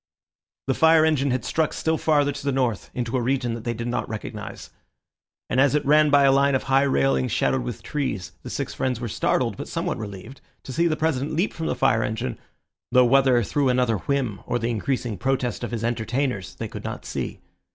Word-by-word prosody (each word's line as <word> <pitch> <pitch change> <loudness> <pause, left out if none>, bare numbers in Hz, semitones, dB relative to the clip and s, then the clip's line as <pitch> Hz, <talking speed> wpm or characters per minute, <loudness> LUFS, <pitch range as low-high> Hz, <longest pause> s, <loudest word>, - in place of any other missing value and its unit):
The 135 - +1
fire 160 +2 +5
engine 145 -3 +2
had 130 0 -1
struck 160 -1 0
still 160 0 0
farther 145 -2 +2
to 145 - -7
the 140 - 0
north, 125 -6 -1
into 120 0 -2
a 125 - +1
region 125 -1 0
that 115 -1 -7
they 120 -1 -1
did 115 +1 -4
not 120 - -2
recognise; 110 -1 -7 0.8
and - - 0
as 145 +1 +4
it 150 - 0
ran 150 +1 +5
by 145 -1 +5
a 135 - +6
line 140 0 +3
of 130 - 0
high 135 0 +3
railings 70 - +2
shadowed - - +1
with - - -6
trees, 130 -11 -3
the - - -8
six - - -3
friends 125 -3 -1
were 120 - -3
startled, 115 0 0
but - - -6
somewhat 170 -3 -2
relieved, 105 +4 -8 0.2
to 130 - -7
see 170 +6 +2
the 155 -2 0
President 155 -1 -1
leap 175 +6 0
from 160 - -4
the - - 0
fire 110 - +2
engine, 110 +2 -3 0.5
though 125 0 +6
whether 130 -1 +4
through 140 +5 +1
another 125 -3 +2
whim 125 -1 -1
or 120 - 0
the 120 0 -1
increasing 120 -2 -2
protest 125 -2 -1
of 120 - -2
his 115 -2 -4
entertainers 120 -2 -2
they - - -5
could - - -8
not - - -6
see. - - -4
130 Hz, 215 wpm, -24 LUFS, 115-140 Hz, 0.8 s, a